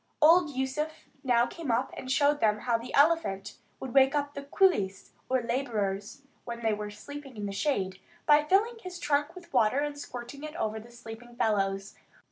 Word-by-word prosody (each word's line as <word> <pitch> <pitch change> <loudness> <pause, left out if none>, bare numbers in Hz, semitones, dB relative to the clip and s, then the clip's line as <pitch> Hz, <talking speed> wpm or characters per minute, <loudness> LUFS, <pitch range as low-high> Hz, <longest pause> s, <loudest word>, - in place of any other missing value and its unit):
Old 330 +1 +6
Yusuf 275 +3 -3 0.2
now 240 -3 +4
came 325 +1 -7
up 240 +3 +1
and 255 - -5
showed 290 +1 +3
them 210 -3 +2
how 240 -2 +1
the 230 +2 -4
elephant 285 -10 +2 0.2
would 260 -2 -6
wake 270 +1 +5
up 285 0 -1
the 280 - -5
coolies, 280 - +1 0.2
or 255 -1 +1
labourers, 230 -1 -2 0.2
when 235 -1 -6
they 220 -1 +2
were 210 0 -4
sleeping 275 +4 -10
in 205 - -4
the 200 - -3
shade, 195 -4 -1 0.3
by 295 0 +6
filling 420 +9 +2
his 365 -3 -7
trunk 295 +1 0
with 345 -2 -13
water 220 +3 +3
and 290 0 -1
squirting 250 +1 -8
it 305 +1 -7
over 220 -6 -2
the 230 +2 -13
sleeping 240 0 -11
fellows. 195 -3 0
260 Hz, 185 wpm, -29 LUFS, 220-295 Hz, 0.3 s, Old